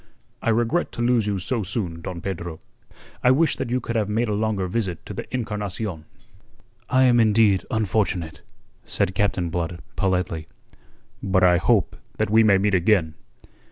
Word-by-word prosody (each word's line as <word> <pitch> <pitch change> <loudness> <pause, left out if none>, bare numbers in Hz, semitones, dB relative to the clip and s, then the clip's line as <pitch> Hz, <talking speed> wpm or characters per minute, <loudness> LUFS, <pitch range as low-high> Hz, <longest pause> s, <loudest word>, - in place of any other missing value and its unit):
"I - - 0
regret 120 +9 +1
to 120 - -4
lose 120 -3 +2
you 100 -1 0
so 115 +6 -1
soon, 90 -4 -3
Don 85 0 -6
Pedro. 85 -4 -5 0.6
I 125 - +5
wish 145 +4 +3
that 125 - -3
you 125 +1 +1
could 115 -1 -5
have 105 -2 0
made 110 +2 0
a - - 0
longer 105 -2 -1
visit 90 -2 -3
to - - -7
the - - -7
Encarnacion." 105 -7 -4 0.8
"I 130 0 +4
am 120 -2 +5
indeed 110 -3 +3
unfortunate," 95 -7 -1 0.4
said 95 - -1
Captain 95 -4 0
Blood 85 0 -3 0.2
politely. 90 -5 -1 0.7
"But 95 -1 +1
I 90 -1 +6
hope 100 +3 +2 0.2
that - - -1
we 110 +1 +6
may 100 -3 +5
meet 100 +1 +1
again." 90 -3 +2
100 Hz, 165 wpm, -23 LUFS, 90-115 Hz, 0.8 s, I